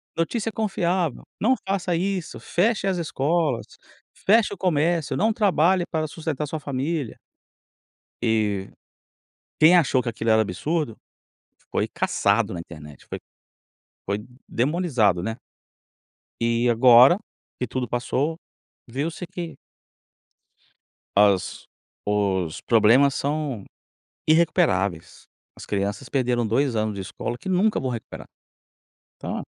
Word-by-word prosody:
"Notícia 215 +7 -1
confiável". 185 - -1 0.2
"Não 255 +5 +4
faça 190 -2 0
isso". 185 0 -2
"Feche 200 +2 0
as 185 -2 0
escolas, 155 -3 0 0.5
feche 215 +1 +3
o - - -8
comércio". 165 -4 +1
"Não 220 +6 +2
trabalhe 185 -4 +3
para 155 -1 -1
sustentar 155 -1 -4
sua 160 0 -4
família". 140 0 -3 1.0
E 105 -4 0 0.9
quem 165 +4 +8
achou 135 -6 +3
que 120 - -4
aquilo 115 0 -2
era 110 0 +5
absurdo, 130 - -2 0.8
foi - - 0
caçado 100 +1 +1
na 85 - -5
internet, 75 -3 -11
foi - - -6 0.9
foi 100 +1 -1 0.3
demonizado, 125 - +1
né? 115 +2 -3 1.0
E 115 +1 +2
agora 125 +6 +7 0.4
que 125 - -2
tudo 125 +1 -3
passou 135 +6 -1 0.5
viu-se 150 +8 -4
que 170 -4 -6 1.6
as 100 -2 +2 0.4
os 95 -5 0
problemas 120 +5 +4
são 140 -7 -2 0.6
irrecuperáveis. 100 - +1 0.3
As - - -10
crianças 100 +5 -3
perderam 125 -4 0
2 130 +2 +1
anos 110 -1 -1
de 100 - -4
escola 120 +5 -5
que 190 - -7
nunca 195 +4 +2
vão 130 - -2
recuperar. 120 -3 -7 0.9
Então - - -5
135 Hz, 115 wpm, -24 LUFS, 110-170 Hz, 1.6 s, quem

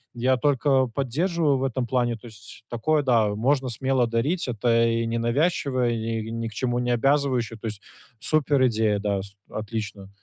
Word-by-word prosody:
я 125 +2 +2
только 135 -1 +2
поддерживаю 145 +5 0
в - - -2
этом 130 -1 -1
плане, 120 -1 0
то 110 - -17
есть 110 +1 -14
такое, 145 +6 +1
да, 120 -5 +3
можно 130 +3 +1
смело 130 +1 +1
дарить. 130 +9 -1
Это 115 0 +2
и 115 0 0
ненавязчивая 125 +2 0
и 115 -1 -3
ни 115 0 -3
к 110 - -9
чему 120 0 -1
не 125 0 -1
обязывающая, 125 -2 +1
то 115 - -5
есть 105 -1 -6 0.4
суперидея. 125 -9 +2
Да, 100 -1 -1
с 100 0 -12
отлично. 105 -2 -5
120 Hz, 165 wpm, -25 LUFS, 115-135 Hz, 0.4 s, да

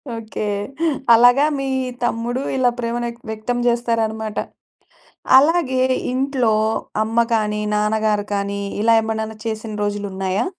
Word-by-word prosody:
Okay. 220 -1 -5 0.7
అలాగా 245 +5 +6
మీ 270 - -2 0.4
తమ్ముడు 240 +2 -1 0.2
ఇలా 250 -1 +3
ప్రేమను 240 0 -2
ఎక్త్ 235 0 -18
వ్యక్తం 220 +3 -3
జేస్తారనమాట. 225 -2 -1 1.0
అలాగే 285 -4 +2 0.3
ఇంట్లో 260 -4 +1 0.5
అమ్మ 225 +1 -4 0.2
కానీ, 210 -1 -1
నాన్నగారు 210 0 +1
కానీ 200 0 -2 0.2
ఇలా 230 0 +5
ఎమనన్నా 220 0 -3
చేసిన 220 0 -4
రోజులున్నాయా? 200 - -2
225 Hz, 110 wpm, -20 LUFS, 215-245 Hz, 1.0 s, అలాగా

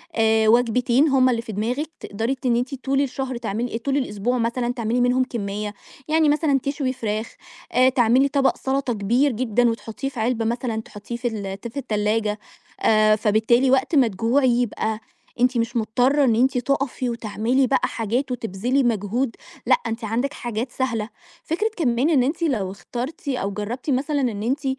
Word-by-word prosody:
آآ 220 0 +3
وجبتين 245 +4 +3
هُم 260 -2 +4
اللي 235 -2 0
في 230 - -8
دماغِك 245 +9 -2
تقدري 225 +6 -2
ت 265 - -14
إن 240 -2 +3
أنتِ 250 +3 -1
طول 270 +1 0
الشهر 265 -2 -3
تعملي 230 +1 -3
آآ - - 0
طول 270 +4 -1
الأسبوع 245 -2 -1
مثلًا 240 +1 -1
تعملي 235 0 -1
منهم 250 +1 +3
كمية، 210 -4 -4 0.3
يعني 315 0 +3
مثلًا 295 -2 +2
تشوي 275 -2 -1
فراخ، 220 -2 -4 0.4
آآ 255 +1 +5
تعملي 255 +1 +3
طبق 275 -1 +1
سلطة 265 -2 -1
كبير 235 +7 +2
جدًا 240 0 +1
وتحطيه 230 +3 -4
في 260 -4 -8
علبة 230 0 0
مثلًا 235 -1 -2
تحطيه 210 +2 -8
في 240 +1 -2
ال 200 -4 -4
ت - - -5
في 235 - -10
التلاجة، 210 -3 0 0.4
آآ 215 -1 +4
فبالتالي 220 +4 +2
وقت 265 +4 +2
ما 265 -4 +5
تجوعي 230 +6 +2
يبقى 220 -2 -2 0.4
أنتِ 250 0 +3
مش 230 +1 -1
مضطرة 245 +6 +2
إن 235 -4 +3
أنتِ 255 +3 +2
تقفي 260 0 -1
وتعملي 235 +3 0
بقى 265 - +2
حاجات 240 +5 -2
وتبذلي 245 +3 -1
مجهود، 230 +2 0 0.3
لأ - - +5
أنتِ 225 +1 -4
عندِك 235 +6 -1
حاجات 240 +1 -4
سهلة 235 -5 -2 0.3
فكرة 420 +8 -1
كمان 260 -2 +1
إن 280 -6 +4
أنتِ 305 +6 -1
لو 220 - 0
اخترتِ 250 +9 -6
أو 225 -7 -1
جربتِ 220 +8 -5
مثلًا 280 +2 0
إن 220 -5 -1
أنتِ 270 +5 -1
245 Hz, 175 wpm, -23 LUFS, 220-265 Hz, 0.4 s, آآ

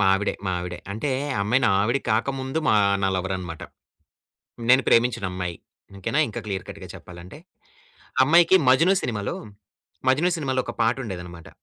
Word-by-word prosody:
మా 95 - +3
ఆవిడే. 105 +2 -1
మా - - 0
ఆవిడే. 90 0 -6
అంటే 125 +7 -3 0.3
ఆ - - -1
అమ్మాయి 120 +6 +2
నా - - +3
ఆవిడ 115 +6 +1
కాకముందు 130 +6 -1
మా 110 - +5 0.3
నా 95 - +2
లవరనమాట. 90 -3 -4 1.1
నేను 130 +1 +6
ప్రేమించినమ్మాయి 95 -8 +1 0.4
ఓకేనా. 135 +10 0
ఇంకా 110 - -6
క్లియర్ 95 -2 -3
కట్‌గా 95 -2 -9
చెప్పాలంటే. 90 - -11 0.8
ఆ - - +4
అమ్మాయికి 170 +5 +6
'మజ్ను' 165 +9 +5
సినిమాలో 105 -4 -3 0.7
'మజ్ను' 165 +7 +3
సినిమాలో 130 -4 -1
ఒక - - -4
పాటుండేదన్నమాట 95 -8 -3
110 Hz, 145 wpm, -24 LUFS, 95-130 Hz, 1.1 s, నేను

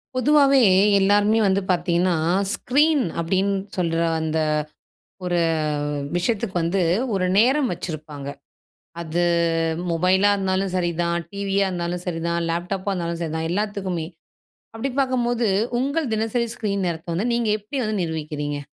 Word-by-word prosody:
பொதுவாவே 275 +1 +4 0.4
எல்லாருமே 205 +3 +3
வந்து 195 0 +2
பார்த்திங்கன்னா, 175 0 +1 0.4
ஸ்க்ரீன் 295 +2 +2 0.2
அப்படின்னு 190 +4 +1 0.2
சொல்ற 165 -2 0 0.2
அந்த 160 0 -1 0.9
ஒரு 175 -1 +1 0.8
விஷயத்துக்கு 200 +2 -1
வந்து 175 +4 0 0.3
ஒரு 190 -2 +1
நேரம் 260 +4 +3
வச்சிருப்பாங்க. 155 -5 -7 0.8
அது 170 +1 -1 0.7
மொபைலா 185 +4 +3
இருந்தாலும் 190 -1 -1
சரிதான். 170 -1 0 0.2
டிவியா 200 0 0
இருந்தாலும் 175 0 -3
சரி 165 -2 -3
தான். 170 0 0
லேப்டாப்பா 185 +4 -2
இருந்தாலும் 170 -2 -3
சரிதான் 160 0 -2
எல்லாத்துக்குமே. 190 -4 -2 0.7
அப்படி 225 +5 -3
பார்க்கும்போது, 245 -3 +1 0.3
உங்க 280 +5 0
தினசரி 225 +2 0
ஸ்க்ரீன் 200 -3 -2
நேரத்த 165 0 -4
வந்து 225 +7 0
நீங்க 235 -2 0
எப்படி 260 +7 -5
வந்து 215 -2 -1
நிர்வகிக்கிறீங்க? 150 -3 -4
190 Hz, 120 wpm, -22 LUFS, 170-220 Hz, 0.9 s, பொதுவாவே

